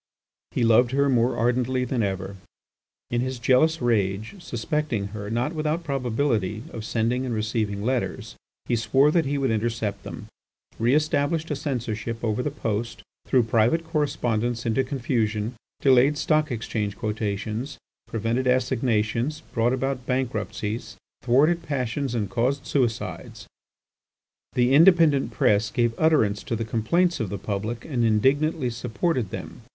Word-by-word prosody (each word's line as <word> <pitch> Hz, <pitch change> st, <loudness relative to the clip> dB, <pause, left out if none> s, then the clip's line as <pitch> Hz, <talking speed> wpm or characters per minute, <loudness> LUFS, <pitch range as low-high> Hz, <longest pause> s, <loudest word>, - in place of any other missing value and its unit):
He -, -, -1 dB
loved 120 Hz, +2 st, +4 dB
her 140 Hz, +1 st, +3 dB
more 125 Hz, -1 st, +2 dB
ardently 125 Hz, +2 st, +1 dB
than 125 Hz, -1 st, -1 dB
ever. 95 Hz, -1 st, -3 dB, 0.7 s
In 120 Hz, 0 st, +1 dB
his 130 Hz, 0 st, -2 dB
jealous 130 Hz, +5 st, +3 dB
rage, 105 Hz, -3 st, 0 dB
suspecting 120 Hz, -, -2 dB
her, 105 Hz, 0 st, -6 dB
not 120 Hz, +8 st, -1 dB
without 155 Hz, +2 st, -1 dB
probability, 120 Hz, -, -1 dB
of 110 Hz, -, -5 dB
sending 115 Hz, +3 st, 0 dB
and 125 Hz, -3 st, -2 dB
receiving 110 Hz, -2 st, -1 dB
letters, 125 Hz, +1 st, -2 dB, 0.3 s
he 120 Hz, -, +1 dB
swore 135 Hz, +6 st, +3 dB
that 160 Hz, -3 st, +2 dB
he 145 Hz, +1 st, 0 dB
would 135 Hz, -3 st, +1 dB
intercept 110 Hz, -2 st, -1 dB
them, -, -, -8 dB, 0.5 s
re 120 Hz, +4 st, +3 dB
established 155 Hz, +1 st, 0 dB
a -, -, 0 dB
censorship 115 Hz, -4 st, -3 dB
over 110 Hz, +1 st, 0 dB
the 150 Hz, -, -1 dB
post, 115 Hz, -5 st, -3 dB, 0.2 s
threw 130 Hz, -3 st, +4 dB
private 115 Hz, +8 st, +2 dB
correspondence 120 Hz, -7 st, -1 dB
into 115 Hz, +3 st, +1 dB
confusion, 115 Hz, -4 st, -1 dB, 0.3 s
delayed 135 Hz, +2 st, +5 dB
stock 155 Hz, -1 st, +2 dB
exchange 110 Hz, -4 st, -3 dB
quotations, 110 Hz, +4 st, -3 dB, 0.3 s
prevented 115 Hz, +3 st, -1 dB
assignations, 125 Hz, +1 st, +1 dB
brought 115 Hz, +1 st, +2 dB
about 130 Hz, 0 st, -2 dB
bankruptcies, 115 Hz, -3 st, -3 dB, 0.2 s
thwarted 150 Hz, +8 st, +3 dB
passions, 130 Hz, -3 st, -2 dB
and 105 Hz, -4 st, -2 dB
caused 130 Hz, +5 st, 0 dB
suicides. 120 Hz, -5 st, -2 dB, 1.1 s
The 125 Hz, +1 st, +3 dB
independent 160 Hz, -3 st, +5 dB
press 110 Hz, -6 st, +2 dB
gave 120 Hz, +1 st, +1 dB
utterance 130 Hz, -11 st, +3 dB
to 115 Hz, -, -2 dB
the 115 Hz, 0 st, -3 dB
complaints 160 Hz, +11 st, +1 dB
of 110 Hz, -5 st, -2 dB
the 100 Hz, -, -3 dB
public 110 Hz, +4 st, -4 dB
and 130 Hz, -6 st, -1 dB
indignantly 135 Hz, +5 st, +2 dB
supported 125 Hz, -, -1 dB
them. -, -, -7 dB
120 Hz, 140 wpm, -25 LUFS, 110-140 Hz, 1.1 s, delayed